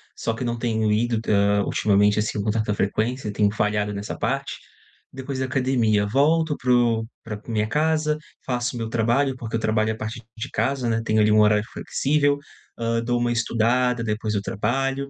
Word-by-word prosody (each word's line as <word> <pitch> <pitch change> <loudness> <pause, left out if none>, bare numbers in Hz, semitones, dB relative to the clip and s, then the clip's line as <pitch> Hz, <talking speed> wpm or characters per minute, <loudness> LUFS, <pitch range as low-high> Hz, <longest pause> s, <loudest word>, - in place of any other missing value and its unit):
Só 115 - -2
que 120 +2 -4
não 120 0 -2
tenho 110 -2 0
ido, 115 +1 +1
hã, 100 0 +3
ultimamente, 105 0 +2
assim, 105 -1 -1
com 105 - -2
tanta 110 -1 0
frequência, 110 +3 -1
tenho 105 -1 +2
falhado 105 -1 0
nessa 100 +1 -5
parte. 135 +5 -2 0.6
Depois 135 0 -5
da 130 - 0
academia 125 -6 +1
volto 150 +6 +2
para 125 0 0
o 115 -2 +2 0.2
pra 105 -2 -6
minha 110 -2 0
casa, 155 +2 +1 0.3
faço 125 -1 -2
meu 115 -1 -3
trabalho, 120 +4 +1
porque 115 -1 -5
eu - - -3
trabalho 110 0 +1
a - - -9
partir 110 +2 -6
de 130 +5 -5
casa, 135 -3 0
né, 115 0 0
tenho, 110 -1 +1
ali, 105 0 +4
um 110 - +6
horário 105 0 +3
flexível, 145 0 +1 0.4
hã, 115 0 0
dou 120 0 0
uma 120 0 +1
estudada, 120 +1 +1
depois 105 0 -2
eu 100 - 0
trabalho. 135 +7 -1
115 Hz, 185 wpm, -23 LUFS, 105-130 Hz, 0.6 s, um